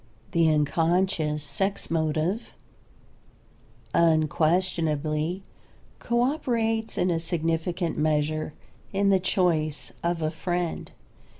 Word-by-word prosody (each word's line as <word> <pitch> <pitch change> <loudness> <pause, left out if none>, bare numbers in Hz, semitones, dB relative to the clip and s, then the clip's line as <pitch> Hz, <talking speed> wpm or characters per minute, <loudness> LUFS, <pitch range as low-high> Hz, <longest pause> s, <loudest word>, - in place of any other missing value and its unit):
The 165 -2 +4
unconscious 155 0 +1
sex 195 +8 -2
motive 160 +6 -1 1.4
unquestionably 160 0 +1 0.6
co 235 0 0
operates 230 -5 0
in 180 - +2
a 165 - +1
significant 165 +1 -1
measure 155 0 0 0.4
in 200 0 +2
the 190 - +4
choice 155 - 0
of 170 -1 -1
a 155 - 0
friend. 175 -1 -3
165 Hz, 90 wpm, -26 LUFS, 155-185 Hz, 1.4 s, The